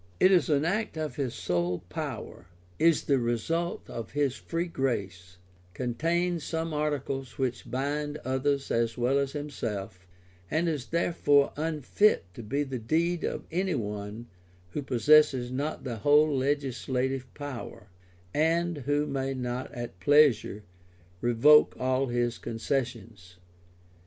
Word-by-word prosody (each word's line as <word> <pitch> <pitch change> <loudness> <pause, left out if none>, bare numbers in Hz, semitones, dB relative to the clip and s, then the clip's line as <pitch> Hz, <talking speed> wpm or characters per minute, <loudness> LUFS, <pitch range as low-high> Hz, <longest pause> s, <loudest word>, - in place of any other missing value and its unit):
It 185 - +6
is 180 -5 +4
an 145 0 +2
act 205 0 -1
of 155 -5 -4
his 130 -5 -2
sole 90 0 -1
power, - - -6 0.3
is 165 0 +4
the 140 -2 +2
result 125 +9 -1
of 115 -5 -7
his 140 -2 +1
free 170 +3 -3
grace, 95 - -3 0.4
contains 165 +7 0
some 160 0 -3
articles 140 -4 -2
which 125 -2 -2
bind 145 +4 -2
others 135 +2 0
as 115 0 0
well 125 +3 +2
as 140 -1 -1
himself, 105 -10 -5 0.4
and 160 +3 +1
is 150 -6 -2
therefore 145 -4 +2
unfit 160 - +2
to - - -8
be 140 +7 -1
the 135 -3 -4
deed 165 +8 0
of - - -3
any 180 +1 0
one 105 -1 -4 0.5
who 150 - -3
possesses 135 -1 +4
not 145 +4 -3
the 120 -4 -4
whole 145 +5 +4
legislative 130 -1 -1
power, 140 -7 -7 0.5
and 165 +1 +1
who 145 +1 +2
may 135 -1 -2
not 125 0 -4
at 120 -6 -7
pleasure 120 -3 +4 0.6
revoke 120 +6 +6
all 130 +1 +1
his 120 -1 -1
concessions. 115 -6 -4
135 Hz, 130 wpm, -28 LUFS, 120-150 Hz, 0.6 s, It